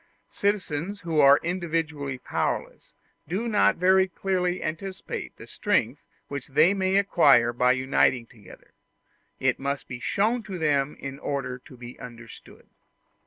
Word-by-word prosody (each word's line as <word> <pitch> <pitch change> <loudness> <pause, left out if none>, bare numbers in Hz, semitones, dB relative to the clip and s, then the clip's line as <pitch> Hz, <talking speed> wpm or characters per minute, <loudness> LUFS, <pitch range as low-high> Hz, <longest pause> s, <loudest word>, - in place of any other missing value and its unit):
Citizens 200 -1 -2
who 165 -4 -1
are 140 0 +7
individually 160 -6 -2
powerless, 125 - -4 0.3
do 195 +9 -2
not 215 -3 +3
very 190 +2 +4
clearly 185 -1 -1
anticipate 185 +5 -5
the - - -11
strength - - -1 0.3
which 140 -2 -6
they 155 +7 +4
may 190 -1 0
acquire 145 -12 +4
by 125 +1 +3
uniting 130 -1 +2
together; 110 -4 -17 0.7
it - - +1
must 140 0 -3
be 130 - -7
shown 220 - 0
to 195 -4 -7
them 145 -3 +1
in 135 0 -7
order 130 -4 -3
to 125 - -16
be 120 0 -11
understood. 120 -2 -12
155 Hz, 135 wpm, -26 LUFS, 130-185 Hz, 0.7 s, are